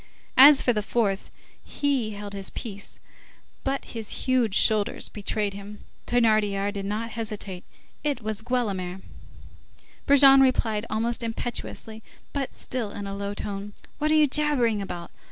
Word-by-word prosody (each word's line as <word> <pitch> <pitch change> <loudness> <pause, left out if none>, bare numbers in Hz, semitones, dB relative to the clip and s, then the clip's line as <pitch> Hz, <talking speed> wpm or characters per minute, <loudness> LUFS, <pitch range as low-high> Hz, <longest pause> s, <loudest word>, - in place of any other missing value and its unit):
As 280 +1 +10
for 245 - +3
the 210 - 0
fourth, 205 -2 -1 0.3
he 265 -7 -1
held 205 0 -7
his 195 -1 -3
peace, 200 -4 -7 0.7
but 270 0 -2
his 225 -3 -5
huge 250 -6 +2
shoulders 215 -2 +3
betrayed 205 0 -2
him. 200 +1 -9 0.3
Thénardier 210 -4 +2
did 200 -2 -4
not 220 +3 -3
hesitate. 210 -5 -5 0.4
It 290 -4 0
was 215 -1 -4
Guelemer. 195 -7 -2 1.1
Brujon 275 -1 +7
replied 230 -5 +1
almost 230 +2 -1
impetuously 225 - -5 0.3
but 275 -2 -3
still 245 -5 -3
in 205 0 -7
a 195 0 -5
low 200 0 -4
tone:— 205 0 -5 0.3
"What 305 +1 +1
are 310 - +4
you 305 -1 +6
jabbering 265 -7 +2
about? 175 -3 -7
220 Hz, 140 wpm, -25 LUFS, 200-250 Hz, 1.1 s, As